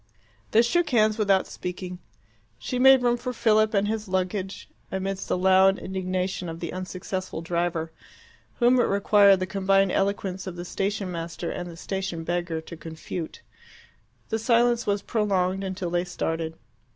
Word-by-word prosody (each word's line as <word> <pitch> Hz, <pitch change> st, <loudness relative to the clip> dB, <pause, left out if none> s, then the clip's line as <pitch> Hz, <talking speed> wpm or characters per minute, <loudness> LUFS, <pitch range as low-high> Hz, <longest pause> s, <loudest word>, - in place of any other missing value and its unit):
They 225 Hz, +2 st, +5 dB
shook 340 Hz, +7 st, +1 dB
hands 215 Hz, -3 st, +3 dB
without 195 Hz, -3 st, +3 dB
speaking. 180 Hz, 0 st, -6 dB, 0.6 s
She 250 Hz, -, -3 dB
made 265 Hz, 0 st, +7 dB
room 240 Hz, 0 st, +3 dB
for 250 Hz, +1 st, -4 dB
Philip 215 Hz, -2 st, +2 dB
and 200 Hz, +1 st, +2 dB
his 215 Hz, 0 st, -2 dB
luggage 190 Hz, +1 st, -2 dB, 0.2 s
amidst 190 Hz, 0 st, -3 dB
the -, -, 0 dB
loud 190 Hz, +1 st, +5 dB
indignation 185 Hz, -1 st, -3 dB
of 165 Hz, 0 st, -7 dB
the 170 Hz, -, -5 dB
unsuccessful 185 Hz, -1 st, -5 dB
driver, 170 Hz, -1 st, -1 dB, 0.6 s
whom 245 Hz, +1 st, +4 dB
it -, -, +4 dB
required 200 Hz, -1 st, +5 dB
the -, -, +1 dB
combined 195 Hz, 0 st, +2 dB
eloquence 195 Hz, -1 st, -1 dB
of 180 Hz, -, -5 dB
the 175 Hz, 0 st, -6 dB
station 195 Hz, +1 st, -2 dB
master 165 Hz, 0 st, -4 dB
and 175 Hz, 0 st, -5 dB
the 165 Hz, -, -10 dB
station 190 Hz, -2 st, -4 dB
beggar 175 Hz, -1 st, -2 dB
to 165 Hz, -, -10 dB
confute. 160 Hz, +1 st, -7 dB, 0.9 s
The 220 Hz, -, -1 dB
silence 235 Hz, +1 st, +2 dB
was 200 Hz, -1 st, 0 dB
prolonged 195 Hz, -3 st, 0 dB
until 185 Hz, -2 st, -4 dB
they 175 Hz, 0 st, 0 dB
started. 165 Hz, -2 st, -3 dB
190 Hz, 155 wpm, -26 LUFS, 175-210 Hz, 0.9 s, made